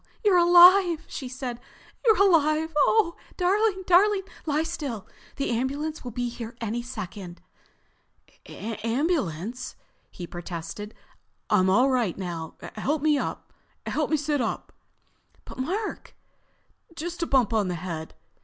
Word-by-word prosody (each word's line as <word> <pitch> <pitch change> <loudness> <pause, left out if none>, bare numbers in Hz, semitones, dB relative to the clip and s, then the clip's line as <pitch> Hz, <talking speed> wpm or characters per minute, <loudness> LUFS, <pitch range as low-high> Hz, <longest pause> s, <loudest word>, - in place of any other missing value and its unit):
"You're 380 -4 +6
alive!" 350 -1 +7
she 260 - -6
said. 255 -2 -5 0.4
"You're 445 -3 +5
alive! 320 -4 +3
Oh, 340 +3 +3 0.2
darling, 385 +1 +2
darling, 385 +3 +4 0.2
lie 300 +1 +1
still, 285 - -5 0.3
the 275 - -2
ambulance 280 +6 -2
will 250 - -5
be 245 +1 -2
here 235 0 -7
any 230 +1 -2
second." 200 -7 -7 1.1
"Ambulance?" 230 - -2 0.3
he 175 - -8
protested. 175 +4 -7 0.6
"I'm 190 -3 +4
all 250 +8 +4
right 240 -8 0
now. 170 -4 -5 0.2
Help 285 +7 -1
me—sit 300 0 -1
up." 230 - -3 0.7
"But - - -11
Mark——" 385 +11 -3 0.8
"Just 345 +2 -5
a 335 - 0
bump 250 -5 +2
on 210 -3 +2
the 180 - -2
head." 165 -2 -6
265 Hz, 115 wpm, -26 LUFS, 215-335 Hz, 1.1 s, alive